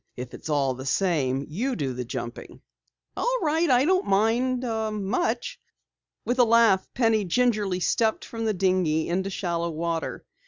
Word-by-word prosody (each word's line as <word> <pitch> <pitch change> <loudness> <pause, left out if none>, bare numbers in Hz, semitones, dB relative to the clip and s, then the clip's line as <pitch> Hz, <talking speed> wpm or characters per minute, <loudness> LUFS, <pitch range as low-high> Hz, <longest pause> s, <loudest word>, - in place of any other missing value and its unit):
"If 125 0 -7
it's - - -8
all 140 -3 +1
the 130 +1 -8
same, 140 -6 0
you 245 - -2
do 135 -5 -2
the 125 0 -4
jumping." 120 0 -7 0.5
"All - - 0
right, 320 +1 +1
I 255 +1 +4
don't 370 +3 +2
mind 235 +6 +1
much." 220 - -2 0.7
With 250 +1 -1
a - - +8
laugh, 230 -4 +4
Penny 225 -3 +2
gingerly 205 -2 +1
stepped 220 +6 +1
from 225 -1 -5
the 215 - +1
dinghy 180 -4 +1
into 190 +3 -1
shallow 170 -3 -2
water. 165 0 -3
200 Hz, 155 wpm, -25 LUFS, 165-245 Hz, 0.7 s, a